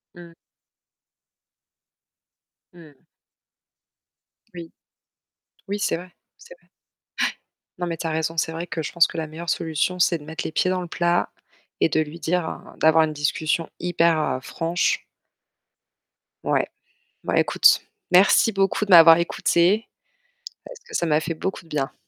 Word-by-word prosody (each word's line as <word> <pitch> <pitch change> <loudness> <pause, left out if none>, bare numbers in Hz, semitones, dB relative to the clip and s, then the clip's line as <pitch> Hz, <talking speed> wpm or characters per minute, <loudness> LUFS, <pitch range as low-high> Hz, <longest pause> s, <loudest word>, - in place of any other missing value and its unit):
Mmh. 170 -1 -13 2.4
Mmh. 155 -5 -17 1.5
Oui. 170 -2 -9 1.0
Oui, 205 +1 -2
c'est 205 - 0
vrai. 180 +1 -11 0.3
C'est - - -14
vrai. - - -33
Ouais. - - -41 1.1
Non, 175 - -2
mais 165 - -4
tu 165 - -4
as - - -2
raison, 160 +1 -2
c'est 160 +1 0
vrai 165 +2 -6
que 160 0 -4
je - - -5
pense 170 -1 +4
que - - -9
la 160 -1 -3
meilleure 165 +2 -7
solution, 165 +3 -1
c'est 170 -1 +3
de 145 - -14
mettre 160 +3 -6
les - - -3
pieds 185 - +1
dans 185 -1 -1
le 175 - -6
plat, 175 +1 0 0.5
et - - +4
de 155 - +1
lui 155 +2 -4
dire, 175 0 -1
heu, - - -11
d'avoir 160 0 +5
une 155 -1 -2
discussion 155 +2 -1
hyper, 170 -2 +2
heu, 130 - -1
franche. 165 +6 -1 1.4
Ouais. - - +1 0.6
Bah - - 0
écoute, - - +4 0.3
merci 200 +4 +5
beaucoup 195 +2 0
de 200 - -9
m'avoir 165 -1 +9
écoutée 175 +4 +1 0.8
parce - - -11
que - - -8
ça 170 - 0
m'a 155 -1 +2
fait 165 +1 -4
beaucoup 190 +2 -5
de 165 - -21
bien. 145 -1 -3
165 Hz, 160 wpm, -23 LUFS, 160-175 Hz, 2.4 s, m'avoir